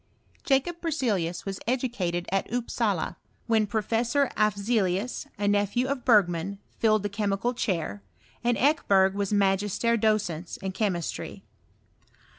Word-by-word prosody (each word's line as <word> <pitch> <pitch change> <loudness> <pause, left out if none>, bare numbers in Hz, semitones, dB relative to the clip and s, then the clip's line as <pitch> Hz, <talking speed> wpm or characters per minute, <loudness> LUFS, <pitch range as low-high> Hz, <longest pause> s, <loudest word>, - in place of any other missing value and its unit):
Jacob 295 +6 +1
Berzelius 225 - -1
was 195 -1 -4
educated 230 -9 -1
at 195 +2 -1
Upsala, 230 -6 -1 0.3
when 220 -2 +2
Professor 230 +6 +1
Afeelius, 205 0 0
a 205 0 -1
nephew 205 +4 +2
of 270 -2 -2
Bergman, 195 -4 +3 0.2
filled 215 -2 +3
the - - 0
chemical 205 +3 -1
chair, 165 - -2 0.4
and 240 -1 +2
Ekebei^ 195 -10 +3
was 200 0 -2
magister 205 +3 +2
docens 200 -6 0
in 190 - -2
chemistry. 185 -4 -3
205 Hz, 115 wpm, -27 LUFS, 190-240 Hz, 0.4 s, Bergman